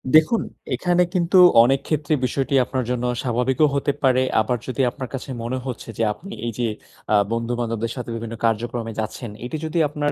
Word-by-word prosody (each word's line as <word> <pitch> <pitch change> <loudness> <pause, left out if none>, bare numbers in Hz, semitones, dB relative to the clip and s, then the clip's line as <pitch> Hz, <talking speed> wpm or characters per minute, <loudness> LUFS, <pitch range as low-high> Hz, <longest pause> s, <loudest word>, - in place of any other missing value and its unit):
দেখুন, 160 +9 +5 0.3
এখানে 180 0 +2
কিন্তু 180 0 +2 0.3
অনেক 135 +3 +3
ক্ষেত্রে 155 0 0
বিষয়টি 135 +3 -1
আপনার 130 0 -2
জন্য 125 -1 -1 0.2
স্বাভাবিকও 130 +4 +2
হতে 140 +1 +1
পারে, 130 -1 +4 0.2
আবার 125 +3 0
যদি 130 +1 -1
আপনার 130 -2 -7
কাছে 135 0 -5
মনে 125 +3 -2
হচ্ছে 125 -3 -6
যে, 115 - +1
আপনি 195 - -12
এই 120 - -1
যে 120 - +1 0.5
আ - - +6 0.2
বন্ধুবান্ধবদের 115 -1 -2
সাথে 125 -3 -6
বিভিন্ন 115 0 -5
কার্যক্রমে 115 0 -1
যাচ্ছেন 110 +2 -4 0.2
এটি 140 +6 -4
যদি 160 +2 -3
আপনার 145 0 -1
125 Hz, 180 wpm, -22 LUFS, 115-145 Hz, 0.5 s, আ